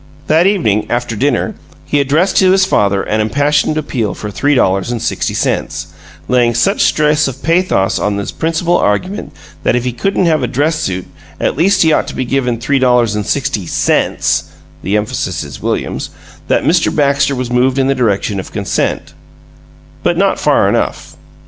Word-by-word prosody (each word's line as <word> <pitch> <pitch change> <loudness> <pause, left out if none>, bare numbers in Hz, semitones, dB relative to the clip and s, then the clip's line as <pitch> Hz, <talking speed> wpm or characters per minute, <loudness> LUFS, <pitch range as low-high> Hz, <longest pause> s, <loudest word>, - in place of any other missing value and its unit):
That 160 +4 +3
evening, 110 - +1
after 120 -1 -2
dinner, 130 +3 0 0.3
he 145 - 0
addressed 155 +7 +1
to 190 - +5
his 190 0 +4
father 100 - +1
an 110 +1 -1
impassioned 145 +7 +1
appeal 125 -8 -2
for 105 - -6
three 145 +7 +1
dollars 95 -2 +1
and 120 - -2
sixty - - -2
cents, - - -2 0.3
laying 120 -2 +2
such 195 - +1
stress 150 -1 +2
of 135 0 -7
pathos 165 - +1
on 105 -1 -1
his 100 - -4
principal 165 +2 0
argument 185 - -1 0.3
that - - +1
if 125 - 0
he 125 - -1
couldn't 195 +7 0
have 155 -3 +2
a 125 - 0
dress 150 +7 0
suit, 95 - -3 0.3
at - - 0
least 185 +5 +3
he 160 -1 +3
ought - - +1
to - - -7
be 130 - -2
given 125 -2 -1
three 140 +3 0
dollars 125 -4 +3
and 105 -1 -3
sixty 135 -10 -1
CENTS - - +1 0.4
(the 100 +3 0
emphasis 105 0 -2
is - - -9
William's) - - -3 0.4
that - - +1
Mr. - - +2
Baxter 140 -1 +1
was 125 -1 -4
moved 125 +2 +2
in 135 - +2
the 135 - +2
direction 105 -5 0
of 95 - -8
consent - - -2 0.9
but - - 0
not - - +1
far - - +3
enough. - - -2
130 Hz, 180 wpm, -14 LUFS, 110-155 Hz, 0.9 s, to